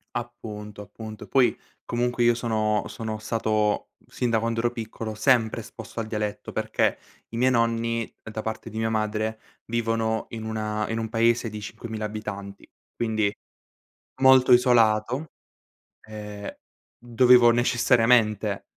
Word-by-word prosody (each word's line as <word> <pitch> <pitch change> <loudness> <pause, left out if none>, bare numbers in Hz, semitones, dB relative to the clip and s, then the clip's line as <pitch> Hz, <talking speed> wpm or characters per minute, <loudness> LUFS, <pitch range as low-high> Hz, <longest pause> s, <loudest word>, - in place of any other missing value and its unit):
Appunto, 105 -4 -6
appunto. 110 +1 -9
E - - -21
poi, 130 -3 +3 0.3
comunque, 120 0 0
io 120 0 +5
sono 110 -3 0
sono 110 -1 -5
stato, 110 -1 0 0.2
sin 125 - -2
da 110 - +3
quando 115 0 -1
ero 120 +1 +1
piccolo, 110 -1 -6
sempre 110 +1 +2
esposto - - -9
al 115 - -3
dialetto, 105 -1 -4
perché - - 0 0.3
i 115 - -6
miei 130 +2 +3
nonni, 115 -1 0
da 110 0 -5
parte 110 +1 -5
di 110 - -7
mia 110 0 0
madre, 110 0 -1 0.3
vivono 115 -1 -1
in 115 -1 -6
una 110 -1 -2
in 115 - -2
un 115 -1 -3
paese 115 +1 +2
di 105 0 -7
5000 110 0 -6
abitanti, 100 -2 -7 0.3
quindi 110 -3 0 0.9
molto 130 -1 +6
isolato, 120 +2 +4 0.8
ehm, 105 -1 -7 0.4
dovevo 120 0 +5
necessariamente 115 -3 +3
110 Hz, 135 wpm, -25 LUFS, 110-120 Hz, 0.9 s, molto